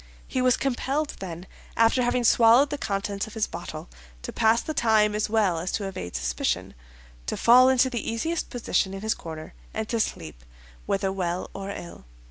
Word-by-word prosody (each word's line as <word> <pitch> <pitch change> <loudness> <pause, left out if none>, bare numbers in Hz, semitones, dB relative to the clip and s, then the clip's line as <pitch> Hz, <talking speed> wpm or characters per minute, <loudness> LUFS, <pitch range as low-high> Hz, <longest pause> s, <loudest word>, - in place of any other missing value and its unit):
He 260 - -1
was 255 -1 +3
compelled, 275 +3 -1
then, 175 -2 -7 0.3
after 230 +3 +4
having 245 0 +1
swallowed 235 +5 +5
the 290 - -2
contents 200 -1 -2
of 220 - -12
his 220 -1 +1
bottle, 165 -1 -7 0.4
to - - -6
pass 225 0 +3
the 310 - -4
time 215 -5 +3
as 210 0 -1
well 205 -6 +2
as 175 +3 -3
to 205 - -1
evade 90 - -6
suspicion, - - -1 0.5
to - - -2
fall 250 +2 +7
into 260 0 +4
the 240 -4 -3
easiest 320 +9 -2
position 210 -5 -1
in 195 - -7
his 220 +1 +1
corner 160 -1 -9 0.2
and 220 - -2
to 230 - 0
sleep, 80 - -3 0.4
whether 195 -1 0
well 180 -2 -3
or 195 0 -6
ill. 170 - -8
215 Hz, 185 wpm, -26 LUFS, 185-245 Hz, 0.5 s, fall